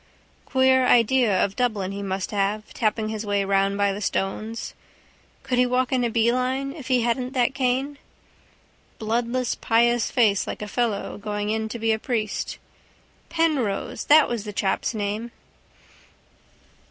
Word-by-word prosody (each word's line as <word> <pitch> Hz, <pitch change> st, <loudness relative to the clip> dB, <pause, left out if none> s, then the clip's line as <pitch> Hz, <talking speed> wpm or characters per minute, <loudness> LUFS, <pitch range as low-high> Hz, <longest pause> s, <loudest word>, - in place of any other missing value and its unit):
Queer 260 Hz, -1 st, +3 dB
idea 235 Hz, -4 st, +4 dB
of 195 Hz, -, -6 dB
Dublin 215 Hz, -6 st, -1 dB
he 200 Hz, 0 st, -5 dB
must 190 Hz, -1 st, -3 dB
have, 205 Hz, +1 st, -1 dB
tapping 215 Hz, -1 st, 0 dB
his 220 Hz, 0 st, -4 dB
way 205 Hz, -1 st, 0 dB
round 195 Hz, 0 st, +1 dB
by 200 Hz, -1 st, +2 dB
the 205 Hz, -, -6 dB
stones. 215 Hz, +4 st, -3 dB, 0.7 s
Could 250 Hz, -1 st, 0 dB
he 250 Hz, -, +5 dB
walk 250 Hz, 0 st, 0 dB
in 255 Hz, -2 st, +1 dB
a 240 Hz, -, +1 dB
beeline 255 Hz, +4 st, 0 dB
if 290 Hz, -6 st, -10 dB
he 255 Hz, -2 st, +2 dB
hadn't 250 Hz, +2 st, -1 dB
that 250 Hz, 0 st, +1 dB
cane? 270 Hz, +2 st, -1 dB, 1.0 s
Bloodless 235 Hz, +3 st, -1 dB
pious 235 Hz, 0 st, +2 dB
face 215 Hz, -6 st, +2 dB
like -, -, -5 dB
a -, -, -5 dB
fellow 215 Hz, -2 st, -2 dB
going 205 Hz, 0 st, -3 dB
in 220 Hz, 0 st, -2 dB
to 235 Hz, -, -5 dB
be 225 Hz, 0 st, +1 dB
a 220 Hz, -, 0 dB
priest. 215 Hz, -3 st, -3 dB, 0.7 s
Penrose! 280 Hz, -9 st, -1 dB
That 305 Hz, 0 st, +6 dB
was 235 Hz, -4 st, -3 dB
that 210 Hz, -1 st, -7 dB
chap's 200 Hz, +4 st, -1 dB
name. 210 Hz, +3 st, -3 dB
230 Hz, 155 wpm, -24 LUFS, 205-250 Hz, 1.0 s, That